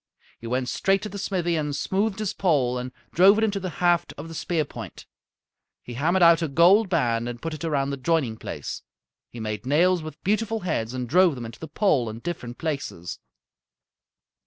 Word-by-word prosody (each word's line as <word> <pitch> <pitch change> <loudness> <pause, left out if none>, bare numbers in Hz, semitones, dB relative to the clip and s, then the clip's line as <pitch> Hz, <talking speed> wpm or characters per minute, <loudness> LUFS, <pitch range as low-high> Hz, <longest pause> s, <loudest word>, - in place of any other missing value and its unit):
He 115 - -8
went 125 +1 -1
straight 195 +8 +1
to 215 - -4
the 200 - -7
smithy 180 -3 -1
and 150 -2 -1
smoothed 195 +5 0
his 215 -2 -2
pole 135 -9 +1
and 125 +1 -5 0.2
drove 195 +4 +6
it 220 - +2
into 205 -2 +1
the 185 -1 -4 0.2
haft 175 0 +2
of 155 +3 -8
the - - -8
spear 160 -1 -1
point. - - -9 0.8
He 120 - -8
hammered 170 +9 +2
out 170 0 +6
a 165 - 0
gold 180 +8 +5
band 120 -8 +1
and 120 -1 -6
put 165 +4 -4
it 155 - -7
around 140 -4 0
the 140 - -3
joining 130 -5 0
place. - - -6 0.5
He 120 - -10
made 110 -1 -4
nails 175 +5 +3
with 155 0 -9
beautiful 220 +2 0
heads 130 -9 -2
and 125 -1 -3
drove 175 +3 +4
them 120 -2 -6
into 115 0 -10
the 160 - -7
pole 145 - +1
in 110 - -7
different 125 -4 -6
places. 140 - -4
160 Hz, 200 wpm, -25 LUFS, 125-185 Hz, 0.8 s, drove